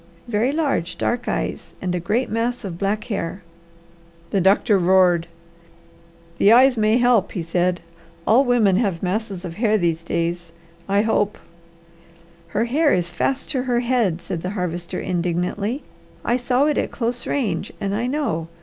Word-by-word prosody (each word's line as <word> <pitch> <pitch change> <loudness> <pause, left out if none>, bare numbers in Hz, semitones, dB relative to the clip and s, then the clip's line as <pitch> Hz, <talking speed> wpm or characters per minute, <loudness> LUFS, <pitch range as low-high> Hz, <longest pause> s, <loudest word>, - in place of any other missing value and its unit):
"Very 235 +3 +1
large, 280 - -1
dark 245 0 -1
eyes, - - -3
and 180 -1 -2
a 180 - 0
great 220 +9 0
mass 235 +3 -2
of 180 -4 -6
black 205 +2 0
hair." 190 -3 -4 0.9
The 195 - +2
doctor 195 +2 +4
roared. 180 -2 +4 1.1
"The 205 - +6
eyes 255 +2 +6
may 215 +1 +3
help," 245 -4 +3
he 175 - -3
said. 175 +1 0 0.4
"All 240 +5 +5
women 230 -7 +3
have 195 -7 -1
masses 195 -1 -2
of 165 -1 -7
hair 215 -1 +2
these 170 -3 0
days. 170 0 -2 0.4
I 200 +1 +3
hope 210 -2 +1 0.6
" 170 0 -27 0.3
"Her 210 +7 0
hair 290 +5 +2
is 175 -1 0
fast 270 +10 -1
to 265 -4 0
her 245 -2 0
head," 235 -9 +1
said 165 - -5
the 180 - -3
Harvester 175 0 -3
indignantly. 180 - -2 0.4
"I 240 - +2
saw 250 +2 +1
it 300 -1 +1
at - - -1
close 240 0 -3
range, 205 -9 -1
and 200 -1 -2
I 230 +4 -1
know. 250 - -1
205 Hz, 165 wpm, -22 LUFS, 175-240 Hz, 1.1 s, The